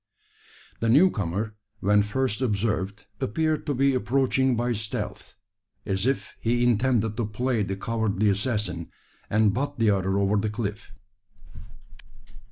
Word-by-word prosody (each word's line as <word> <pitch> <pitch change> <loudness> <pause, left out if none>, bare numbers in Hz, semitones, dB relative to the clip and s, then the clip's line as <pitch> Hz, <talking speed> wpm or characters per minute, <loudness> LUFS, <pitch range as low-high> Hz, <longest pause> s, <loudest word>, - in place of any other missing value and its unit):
The 115 - 0
new 165 +10 +6
comer, 105 +2 -2 0.3
when 105 +2 +4
first 110 +2 -1
observed, 105 -3 -1
appeared 155 +7 -1
to 145 - 0
be 135 +2 +3
approaching 130 0 +2
by 120 +1 0
stealth 105 -1 -5 0.5
as 95 +3 0
if 135 - -2
he 120 +1 +1
intended 120 -2 +2
to 120 - 0
play 120 +2 -1
the 95 -1 -2
cowardly 110 0 0
assassin, 105 -4 -1 0.4
and 105 -1 +3
butt 140 +4 -2
the 110 -2 +3
other 95 0 +1
over 100 +1 +2
the 105 +1 0
cliff! 105 -1 -5
110 Hz, 135 wpm, -26 LUFS, 100-125 Hz, 0.5 s, new